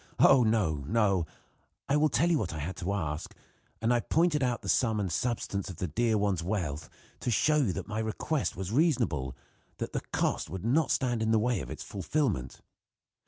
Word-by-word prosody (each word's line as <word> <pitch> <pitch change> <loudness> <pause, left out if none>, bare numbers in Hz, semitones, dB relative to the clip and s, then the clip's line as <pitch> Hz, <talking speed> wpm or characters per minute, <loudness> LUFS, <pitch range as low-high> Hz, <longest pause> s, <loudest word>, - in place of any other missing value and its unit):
Oh! 135 -2 +7
no, 110 -9 +2
no: 100 -5 +2 0.6
I 140 - +2
will 150 +1 +4
tell 170 +3 +2
you 160 - +3
what 85 - -3
I - - -4
had 80 +6 -4
to 90 +2 -2
ask, 80 -5 -3 0.5
and 115 +2 +3
I 120 - +3
pointed 160 +3 +2
out 120 -3 0
the - - -7
sum 110 +5 +2
and 95 -4 -1
substance 100 -1 -2
of 90 - -6
the 90 - -3
dear 110 +7 +1
one's 100 -4 +1
wealth 85 -5 -3 0.3
to - - -3
show 150 +5 +3
that 95 -4 -3
my 110 0 -3
request 110 +7 -1
was 95 0 -4
reasonable 115 - +1 0.4
that - - -5
the - - -1
cost - - 0
would 95 +4 -6
not 150 +7 +2
stand 120 -4 +1
in 110 - +1
the 110 - +4
way 115 0 +1
of - - -6
its - - -6
fulfillment. 95 - -2
110 Hz, 200 wpm, -29 LUFS, 90-125 Hz, 0.6 s, Oh